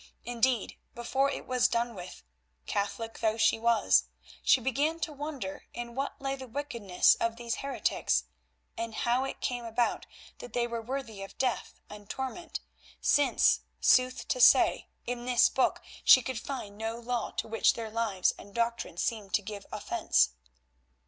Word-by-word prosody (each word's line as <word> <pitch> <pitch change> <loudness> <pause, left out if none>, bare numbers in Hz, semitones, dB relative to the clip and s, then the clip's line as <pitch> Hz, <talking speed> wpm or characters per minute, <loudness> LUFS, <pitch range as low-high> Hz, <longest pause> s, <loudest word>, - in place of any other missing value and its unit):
Indeed, 245 -1 0 0.2
before 260 +4 +1
it - - -5
was 250 -1 +3
done 235 0 -1
with—Catholic 175 - -6
though 220 0 +1
she 220 0 +3
was—she 235 +2 +2
began 285 +6 0
to 310 - -2
wonder 280 -9 -6
in 240 0 -6
what 270 +3 -3
lay 270 0 -2
the 265 -1 -9
wickedness 230 -8 +2
of 230 0 0
these 235 -1 -3
heretics, 275 0 0 0.5
and 230 -1 -4
how 245 +3 +1
it 270 - -6
came 245 -1 -2
about 230 +1 -1 0.3
that 240 - -10
they 240 -1 +1
were 235 -1 -4
worthy 235 -4 -5
of 195 - -9
death 255 -2 -1
and 205 -1 -12
torment, 270 +6 -5 0.4
since, 290 -1 +3 0.2
sooth 255 0 +3
to - - 0
say, - - +6 0.2
in 240 0 -4
this 250 -1 +4
Book 265 - +1 0.2
she 255 - +8
could 260 -3 -3
find 215 -7 -6
no 225 +1 -3
law 240 -1 -2
to - - -1
which 225 0 +3
their 225 -2 -5
lives 215 -5 +1
and 200 - -13
doctrine 235 -6 -1
seemed 205 -1 -1
to 205 - 0
give 205 0 -8
offence. 65 0 +1
235 Hz, 155 wpm, -30 LUFS, 220-255 Hz, 0.5 s, she